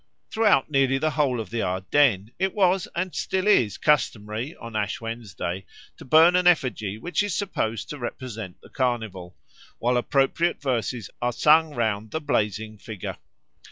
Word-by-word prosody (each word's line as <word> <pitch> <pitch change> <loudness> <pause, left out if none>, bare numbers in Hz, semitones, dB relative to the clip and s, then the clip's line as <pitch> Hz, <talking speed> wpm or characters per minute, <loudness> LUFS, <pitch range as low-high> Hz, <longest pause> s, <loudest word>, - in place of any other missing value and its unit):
Throughout 210 -11 +3
nearly 135 -1 +3
the 155 +3 0
whole 135 -4 +1
of 110 -5 -6
the 115 -1 -1
Ardennes 100 +3 +1
it 190 0 0
was 190 -2 +2
and 185 +1 -2
still 190 0 -1
is 125 - +3
customary 120 -2 0
on 115 -1 -10
Ash 105 -1 -1
Wednesday 100 -5 -5 0.3
to - - -12
burn 160 +6 +6
an 180 0 +3
effigy 125 - +1
which 175 - -1
is 205 -4 -1
supposed 115 - -2
to 150 - -6
represent 115 -6 -6
the - - -16
Carnival, 110 -9 -3 0.4
while 125 +1 +1
appropriate 140 +7 +1
verses 125 -5 -2
are 120 0 +1
sung 155 +4 +4
round 110 -3 0
about - - -24
the 160 - -2
blazing 110 -6 -1
figure. 105 -4 -7
125 Hz, 160 wpm, -25 LUFS, 110-155 Hz, 0.4 s, burn